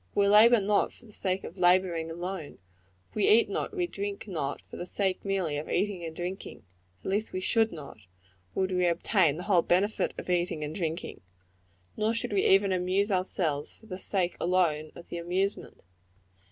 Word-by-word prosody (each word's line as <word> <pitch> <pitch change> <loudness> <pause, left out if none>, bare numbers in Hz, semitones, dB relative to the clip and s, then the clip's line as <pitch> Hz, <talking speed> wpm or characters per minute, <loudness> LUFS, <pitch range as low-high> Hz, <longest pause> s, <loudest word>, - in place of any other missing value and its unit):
We 200 0 +4
labor 220 +3 +7
not 205 +1 +2
for 245 - -18
the 215 - -15
sake 190 -2 -2
of 180 - -9
laboring, 175 -2 +3
alone; 175 -1 -5 0.6
we 210 - +1
eat 225 +2 +6
not, - - -2
and 420 - -11
we 360 - +1
drink 205 - -5
not, 155 -7 -3
for - - -13
the 175 - -5
sake, 190 -1 -1
merely, 190 -7 -1
of 150 - -5
eating 195 -1 -1
and 160 -1 -6
drinking 180 -3 -6 0.4
at - - -3
least 210 +3 -1
we 185 - -1
should 225 +4 +2
not, 150 -8 -9 0.6
would 190 0 0
we 180 -1 +2
obtain 170 -2 +2
the 180 - -5
whole 185 -4 +4
benefit 190 +6 +1
of - - -7
eating 175 -3 0
and 150 +1 -4
drinking; 165 - -4 0.7
nor 220 +2 0
should 225 - -3
we 195 - +2
even 195 0 +5
amuse 185 +3 +1
ourselves 175 -6 -1
for - - -19
the 185 -4 -7
sake 185 -2 0
alone 165 -4 +1
of 170 - -12
the 170 - -4
amusement. 185 +4 -2
185 Hz, 190 wpm, -29 LUFS, 170-200 Hz, 0.7 s, labor